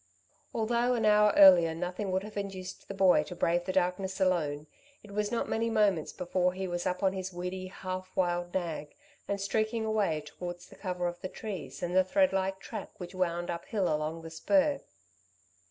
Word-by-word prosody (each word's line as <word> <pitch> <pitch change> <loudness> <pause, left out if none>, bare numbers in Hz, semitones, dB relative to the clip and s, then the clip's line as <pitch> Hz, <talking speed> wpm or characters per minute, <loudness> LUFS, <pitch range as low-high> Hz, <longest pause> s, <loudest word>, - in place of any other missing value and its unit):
Although 235 +2 +1
an 225 -2 0
hour 210 0 +6
earlier 175 -5 +8
nothing 180 +4 -3
would 190 +1 0
have 210 +1 -9
induced 195 -2 -6
the 200 - -6
boy 190 -2 +5
to 180 - -8
brave 175 0 +1
the 185 - -1
darkness 185 +1 0
alone, 155 -6 +1 0.4
it 210 - -13
was 210 +1 -1
not 235 - -1
many 230 +1 0
moments 205 -8 +2
before 180 0 0
he 190 0 -3
was 175 -1 -2
up 180 +2 -2
on 190 -1 +3
his 190 -1 -4
weedy, 180 +1 -5
half 185 0 -6
wild 175 -1 0
nag 165 -5 -3 0.3
and 200 0 -1
streaking 220 +3 0
away 205 -8 +1
towards 175 +3 -7
the - - -15
cover 180 -2 -3
of 175 0 -5
the 185 - -4
trees 175 -12 -7
and 175 +1 -2
the 185 - +6
threadlike 190 -5 +1
track - - -7
which 180 0 -7
wound 175 -2 -1
uphill 175 +1 -1
along 155 +2 -3
the 165 - -8
spur. 285 - +2
185 Hz, 185 wpm, -30 LUFS, 175-200 Hz, 0.4 s, earlier